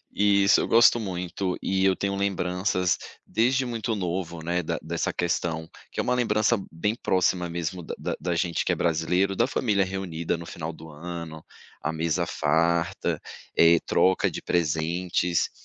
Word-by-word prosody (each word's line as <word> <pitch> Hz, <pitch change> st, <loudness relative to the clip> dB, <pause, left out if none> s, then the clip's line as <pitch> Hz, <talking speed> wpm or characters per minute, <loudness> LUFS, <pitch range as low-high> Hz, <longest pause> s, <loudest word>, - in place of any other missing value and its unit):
Isso, 100 Hz, -1 st, +4 dB
eu -, -, 0 dB
gosto 120 Hz, +1 st, +6 dB
muito, 90 Hz, -2 st, -3 dB
e 95 Hz, 0 st, +1 dB
eu 95 Hz, -1 st, +4 dB
tenho 100 Hz, +1 st, -2 dB
lembranças 90 Hz, -1 st, 0 dB, 0.3 s
desde 130 Hz, +3 st, +2 dB
muito 115 Hz, -1 st, -2 dB
novo, 85 Hz, -3 st, -3 dB
né, 90 Hz, +2 st, -1 dB
da -, -, -2 dB
dessa -, -, -2 dB
questão, 80 Hz, -2 st, -1 dB, 0.2 s
que -, -, -2 dB
é -, -, +2 dB
uma 125 Hz, -, +1 dB
lembrança 110 Hz, -2 st, +2 dB, 0.2 s
bem 105 Hz, +7 st, -1 dB
próxima 90 Hz, -4 st, +1 dB
mesmo 85 Hz, +1 st, -3 dB
da -, -, -6 dB
da -, -, -3 dB
da 90 Hz, +2 st, -1 dB
gente 85 Hz, +1 st, 0 dB
que -, -, +1 dB
é -, -, +3 dB
brasileiro, 90 Hz, +4 st, +1 dB
da 120 Hz, -, +3 dB
família 105 Hz, -7 st, +1 dB
reunida 90 Hz, -3 st, -3 dB
no 85 Hz, -, -8 dB
final 80 Hz, 0 st, -5 dB
do 80 Hz, 0 st, -12 dB
ano, 80 Hz, 0 st, -7 dB, 0.4 s
a 80 Hz, -, -1 dB
mesa 80 Hz, +1 st, 0 dB
farta, 85 Hz, +2 st, +1 dB, 0.4 s
eh, 85 Hz, 0 st, +6 dB
troca 95 Hz, 0 st, +3 dB
de -, -, -5 dB
presentes 85 Hz, +2 st, 0 dB
90 Hz, 165 wpm, -26 LUFS, 85-100 Hz, 0.4 s, gosto